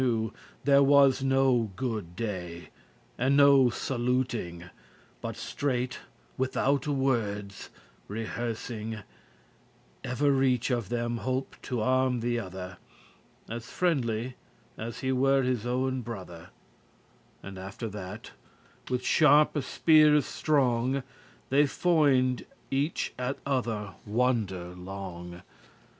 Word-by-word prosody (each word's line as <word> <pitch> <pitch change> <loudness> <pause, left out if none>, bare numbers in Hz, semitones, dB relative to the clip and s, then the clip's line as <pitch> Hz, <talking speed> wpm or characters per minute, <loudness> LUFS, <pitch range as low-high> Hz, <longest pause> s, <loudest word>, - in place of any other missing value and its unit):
*When 130 - +3
they - - +3
recognised 110 -2 -1
each - - -23
There 140 0 +6
was 140 -1 +5
no 135 -5 +3
good 105 -7 -4
day, 90 -6 -5 0.5
and 135 +3 +3
no 140 -3 +7
saluting, 120 -8 -2
other - - -11
afar 90 - -15
off* - - -29
But - - -5
straight, 125 -3 -2 0.4
withoute 135 +1 +1
wordes 115 -8 -1 0.4
rehearsing, 110 0 -4 1.0
Evereach 130 -2 +2
of 115 -6 -5
them 120 0 -1
holp 130 +2 -2
to 125 -4 -3
arm 130 0 +2
the 120 0 0
other, 95 -3 -7 0.7
As 115 +1 -6
friendly, 125 -8 -1 0.4
as 115 +1 -6
he 130 - 0
were 135 +1 +3
his 125 -2 -1
owen 130 +1 0
brother. 95 -7 -8 0.9
And 95 -1 -8
after 95 +5 -6
that, 105 +1 -8 0.6
with 125 0 -1
sharpe 150 0 +5
speares 150 0 +5
strong 130 -3 +1 0.5
They 145 +2 +5
foined* 140 -6 +2 0.3
each 140 +4 -1
at 125 +2 -2
other 115 -7 -1
wonder 105 -6 0
long. 90 -1 -8
125 Hz, 115 wpm, -28 LUFS, 105-135 Hz, 1.0 s, no